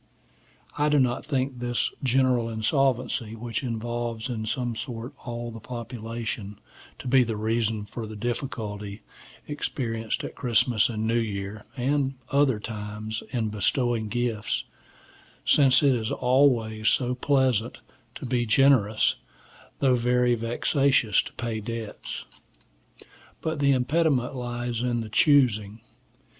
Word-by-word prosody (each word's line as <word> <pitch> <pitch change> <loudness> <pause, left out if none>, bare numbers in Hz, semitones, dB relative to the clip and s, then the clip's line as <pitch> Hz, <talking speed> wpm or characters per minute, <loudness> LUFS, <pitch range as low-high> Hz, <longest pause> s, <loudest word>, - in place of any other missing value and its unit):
I 150 +1 +3
do 150 -1 +4
not 125 -2 +1
think 130 -3 -2
this 120 0 0
general 130 -2 +2
insolvency, 120 0 0
which 115 -1 -4
involves 120 -1 -3
in 110 -3 -3
some 120 -1 -2
sort 120 +3 -6
all 120 -1 -4
the 115 - -8
population, 115 -2 -6 0.4
to - - -8
be 130 +1 +5
the 115 -3 -1
reason 110 -1 0
of 110 -3 -4
the 110 - -7
difficulty 105 -3 -4 0.4
experienced 115 -6 -3
at - - -5
Christman 120 -1 +3
and 110 -1 -2
New 115 +1 +2
Year, 105 -1 -4
and 135 +1 0 0.2
other 140 -5 +3
times, 105 0 -5
in 115 -4 -1
bestowing 115 +2 0
gifts; 120 -2 -1 0.8
since 135 -1 +5
it 140 -2 +5
is 115 -2 -2
always 125 -4 +3
so 125 -1 +1
pleasant 130 -4 +1 0.3
to - - -7
be 120 -1 0
generous, 110 -3 +4 0.6
though 135 -2 +4
very 125 0 +3
vexatious 120 0 +2
to - - -10
pay 115 -2 -3
debts. 115 0 -6 1.1
But 160 -2 -3
the 140 -1 +4
impediment 135 0 +1
lies 120 -1 -3
in 120 -1 0
the 110 - -6
choosing. 110 -5 +3
120 Hz, 125 wpm, -26 LUFS, 110-130 Hz, 1.1 s, be